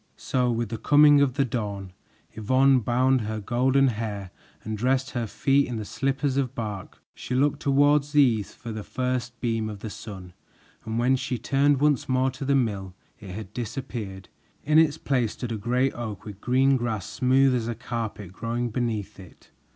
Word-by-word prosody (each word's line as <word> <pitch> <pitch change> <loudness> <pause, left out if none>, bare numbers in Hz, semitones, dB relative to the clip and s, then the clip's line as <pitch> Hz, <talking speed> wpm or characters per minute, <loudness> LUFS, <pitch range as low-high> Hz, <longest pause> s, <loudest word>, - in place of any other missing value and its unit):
So 125 -1 0
with 115 -2 -2
the 115 - -5
coming 145 0 +6
of 130 -3 +2
the 140 -2 +2
dawn, 100 -6 -4 0.4
Yvonne 130 +5 +3
bound 125 +2 +2
her 110 0 -3
golden 130 +5 +2
hair 105 -5 -4 0.3
and 110 0 -4
dressed 130 +5 0
her 120 -4 -2
feet 135 +6 +2
in 125 - -4
the 110 - -4
slippers 135 +3 -1
of 135 -2 -1
bark. 105 -4 -6
She 125 - -5
looked 140 +2 +2
toward 145 +1 +4
the 145 0 +1
east 110 -6 0
for 115 - -7
the 110 -1 -5
first 125 -1 -3
beam 115 -2 -1
of 105 -2 -8
the 110 - -6
sun, 100 -5 -9 0.5
and 110 +1 -3
when 125 +3 +3
she 130 -1 -3
turned 140 +2 +2
once 145 -4 +2
more 130 +1 +2
to 135 +2 -7
the 140 +1 +2
mill 100 -8 -1 0.2
it 105 -4 -10
had 100 +1 -8
disappeared. 110 -5 -6 0.4
In 155 +2 +4
its 160 -1 +3
place 125 -8 0
stood 120 -2 -6
a - - -1
great 125 +5 0
oak 110 -5 -6
with 105 -2 -9
green 130 +2 +3
grass 110 -6 -3
smooth 130 +1 +3
as 120 -2 -1
a 120 - -3
carpet 110 -5 -5
growing 115 +3 -3
beneath 110 -4 -3
it. 90 -2 -15
120 Hz, 190 wpm, -25 LUFS, 110-135 Hz, 0.5 s, coming